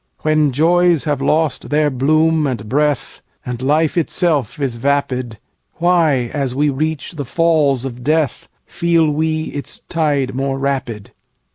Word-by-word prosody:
When 155 -2 +2
joys 170 +3 +3
have 145 -3 -1
lost 150 -1 0
their 150 0 +2
bloom 155 +4 +2
and 115 -5 -4
breathAnd 135 -2 -3
life 150 +4 +1
itself 155 - 0
is 130 -4 -2
vapid, 130 -3 -1 0.4
Why, 160 -8 +2
as 135 -4 -2
we 145 +1 +2
reach 155 +1 -3
the 155 -5 -5
Falls 145 -3 +1
of 125 -2 -6
Death, 155 -2 0 0.2
Feel 165 -2 +1
we 155 +1 -1
its 145 - -5
tide 145 -5 0
more 135 +1 -2
rapid? 130 -6 -3
145 Hz, 135 wpm, -17 LUFS, 130-160 Hz, 0.4 s, joys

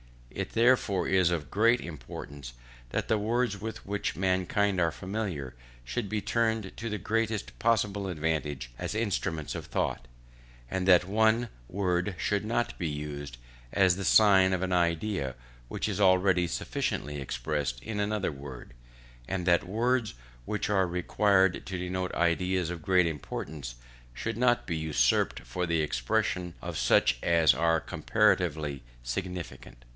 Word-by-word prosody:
It - - -5
therefore 115 -6 +3
is 95 -2 +3
of 80 -5 -3
great 115 +4 +4
importance 70 -3 -8 0.4
that - - -2
the 110 - +2
words 115 -1 0
with 110 +1 -6
which 100 +1 -2
mankind 95 +1 +1
are 85 -2 +3
familiar, 90 - -4 0.3
should 100 - -3
be 105 -1 -1
turned 110 -4 0
to 115 0 -4
the 105 - -2
greatest 110 0 -2
possible 105 -3 +1
advantage 75 -7 -2
as - - -3
instruments 100 -8 -1
of - - -6
thought; - - -2 0.6
that 90 -2 +4
one 110 +4 +2 0.2
word 90 +1 -1
should 100 +4 0
not 120 +2 -1
be 85 - -1
used 75 -3 -5 0.4
as 95 -3 +4
the 100 0 -4
sign 95 -3 +6
of 95 0 0
an 95 - -1
idea 85 - 0 0.3
which - - -3
is - - -2
already 95 -2 +4
sufficiently 75 -3 -3
expressed 70 -2 -3
by - - -4
another 105 -2 -1
word; 70 -4 -10 0.5
and 95 -2 -2
that 85 -1 +3
words 115 - 0 0.3
which 105 - -2
are 95 -3 +3
required 95 +1 +2
to 95 - -3
denote 90 0 -3
ideas 90 +1 +1
of 85 -2 -6
great 90 +2 +3
importance, 75 -4 -5 0.4
should - - -3
not 120 0 +3
be 85 -2 -2
usurped 75 -6 +1
for 90 -1 -3
the 85 -1 +1
expression 90 +1 -1
of - - -5
such 65 - +3
as 85 -3 +4
are 80 +4 +2
comparatively 75 -5 +1 0.2
insignificant. 85 -3 -6
90 Hz, 145 wpm, -29 LUFS, 80-105 Hz, 0.6 s, sign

